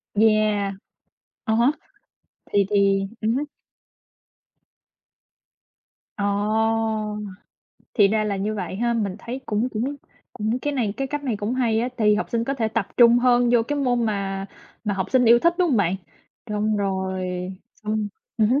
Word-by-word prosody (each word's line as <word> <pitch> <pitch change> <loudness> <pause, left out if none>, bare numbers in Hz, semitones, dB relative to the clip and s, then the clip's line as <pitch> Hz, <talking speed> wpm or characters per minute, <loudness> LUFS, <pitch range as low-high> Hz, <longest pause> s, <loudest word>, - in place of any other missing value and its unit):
Yeah, 215 -2 +3 0.8
à 220 - +1
há, 240 +5 +4 0.8
thì 200 -1 +3
thì 195 -1 +3 0.2
ừm 225 +1 +1
hứm. 285 - 0 2.7
Ờ, 200 - -1 1.7
thì 205 -4 +5
ra 215 +1 +1
là 205 -2 -1
như 205 +3 -2
vậy 190 -2 -4
ha. 235 +2 +1
Mình 200 -5 -1
thấy 250 +4 -6
cũng 220 +3 0
cũng 255 +5 -3 0.4
cũng 220 +3 -1
cái 290 +3 -2
này 230 -7 -1
cái 270 - -1
cách 290 +1 -4
này 245 -6 -1
cũng 210 +4 -2
hay 230 -4 +1
á, 245 - 0
tại 215 -3 +1
vì 210 - +6
học 210 - -2
sinh 230 -1 0
có 275 - -1
thể 230 -5 0
tập 220 -3 -1
trung 240 0 +7
hơn 245 -1 +3
vô 235 -2 +5
cái 290 +5 -2
môn 245 -4 +1
mà 195 -2 -2 0.4
mà 205 - 0
học 190 -1 -1
sinh 260 -1 +4
yêu 235 +1 +7
thích, 340 +7 +3
đúng 360 -1 +3
hông 260 - +2
bạn? 190 -2 +2 0.5
Xong 210 0 0
rồi 190 -1 -1 0.6
xong 215 0 -1 0.3
ừm 220 -2 +3
hứm. 265 +4 +3
220 Hz, 170 wpm, -23 LUFS, 205-245 Hz, 2.7 s, trung